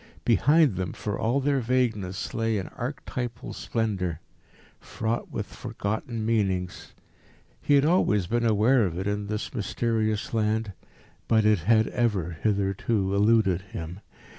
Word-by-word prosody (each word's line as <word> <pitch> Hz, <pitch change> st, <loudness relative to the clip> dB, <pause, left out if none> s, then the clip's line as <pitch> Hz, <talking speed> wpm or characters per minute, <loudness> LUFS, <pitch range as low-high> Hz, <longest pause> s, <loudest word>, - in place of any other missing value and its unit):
Behind 140 Hz, -, +4 dB
them, 95 Hz, -2 st, -3 dB
for 105 Hz, -2 st, -4 dB
all 120 Hz, +5 st, +1 dB
their 140 Hz, 0 st, +1 dB
vagueness, 115 Hz, -7 st, -1 dB
lay 115 Hz, -1 st, 0 dB
an 95 Hz, -, -4 dB
archetypal 125 Hz, -1 st, -5 dB
splendour, 95 Hz, -8 st, -2 dB, 0.6 s
fraught 115 Hz, +1 st, -3 dB
with -, -, -4 dB
forgotten 110 Hz, +2 st, -4 dB
meanings. 95 Hz, -5 st, -1 dB, 0.7 s
He 145 Hz, -, +3 dB
had 140 Hz, +1 st, +4 dB
always 105 Hz, -, +3 dB
been 120 Hz, +6 st, 0 dB
aware 115 Hz, +1 st, +4 dB
of 85 Hz, -1 st, -5 dB
it 95 Hz, -, -3 dB
in 105 Hz, 0 st, -2 dB
this 105 Hz, +1 st, -4 dB
mysterious 110 Hz, -1 st, -1 dB
land, 110 Hz, -1 st, 0 dB, 0.5 s
but 110 Hz, -1 st, +3 dB
it 105 Hz, -3 st, +4 dB
had 110 Hz, +6 st, +3 dB
ever 105 Hz, -8 st, 0 dB
hitherto 100 Hz, 0 st, 0 dB
eluded 100 Hz, -3 st, +3 dB
him. 90 Hz, -1 st, -7 dB
110 Hz, 135 wpm, -26 LUFS, 100-115 Hz, 0.7 s, Behind